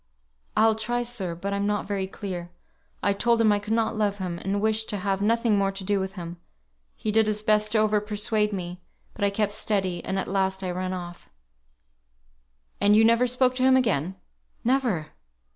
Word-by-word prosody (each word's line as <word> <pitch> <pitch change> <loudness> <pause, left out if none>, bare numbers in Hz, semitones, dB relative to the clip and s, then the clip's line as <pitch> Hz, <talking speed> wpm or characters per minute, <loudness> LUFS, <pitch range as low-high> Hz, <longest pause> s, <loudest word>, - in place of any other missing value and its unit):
"I'll 220 0 +5
try, 240 +3 -1
sir; 205 -8 -1
but 200 +4 -4
I'm 200 0 0
not 205 -1 -1
very 195 -2 -2
clear. 185 -3 -6 0.5
I 200 - +3
told 235 +3 +2
him 220 -2 +5
I 205 - +2
could 210 +2 -3
not 225 0 +1
love 205 -2 0
him, 180 -3 -4
and 195 +3 -1
wished 220 +1 0
to 205 - -1
have 195 0 -1
nothing 225 0 +2
more 195 0 +1
to 195 0 -6
do 200 +1 +1
with 190 0 -3
him. 175 -3 -7 0.6
He 215 - -2
did 220 0 +3
his 210 0 0
best 215 0 +2
to - - +3
over 215 -1 +3
persuade 210 0 0
me, 180 -2 -5 0.3
but 205 - -5
I 200 - +4
kept 205 +1 0
steady, 190 -4 -1
and 190 - -2
at 190 - -2
last 190 0 0
I 185 - -2
ran 185 +1 -3
off." 175 -1 -8 1.5
"And 205 +1 +5
you 220 +1 +6
never 230 +2 +4
spoke 250 +1 +2
to 255 - +1
him 260 0 +6
again?" 190 - 0 0.5
"Never!" 235 - +1
205 Hz, 200 wpm, -26 LUFS, 190-220 Hz, 1.5 s, you